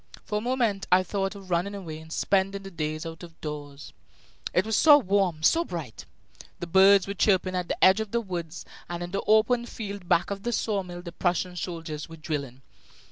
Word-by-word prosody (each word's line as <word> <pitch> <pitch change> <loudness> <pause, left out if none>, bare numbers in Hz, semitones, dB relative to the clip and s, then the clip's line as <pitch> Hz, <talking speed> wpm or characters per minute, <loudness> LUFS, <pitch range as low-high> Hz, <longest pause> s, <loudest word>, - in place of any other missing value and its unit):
For 210 - -1
a - - -7
moment 235 -5 0
I 185 +1 +6
thought 195 +1 -2
of 195 -2 -11
running 180 +4 0
away 165 -6 -7
and 160 0 -13
spending 195 +2 0
the 195 - -9
day 155 -3 -2
out 165 0 -7
of 170 -2 -12
doors. 145 -2 -7 0.6
It 180 - +2
was 220 0 0
so 295 +4 +8
warm, 195 - 0
so 330 - +4
bright! - - -7 0.5
The - - -4
birds 190 +2 +6
were 200 - -4
chirping 185 -2 +2
at 180 -1 -2
the - - -2
edge 190 +3 +7
of 220 -1 -3
the 235 - 0
woods; 175 -6 -6 0.2
and 175 0 -4
in 175 - -6
the 195 - -1
open 235 +3 +3
field 200 -6 -7
back 170 - +2
of 200 -1 -4
the 240 +3 -2
saw 210 -3 0
mill 175 -1 -9
the 170 - -7
Prussian 180 +1 -1
soldiers 165 -3 -5
were 165 - -10
drilling. 140 -5 -5
185 Hz, 210 wpm, -27 LUFS, 170-200 Hz, 0.6 s, so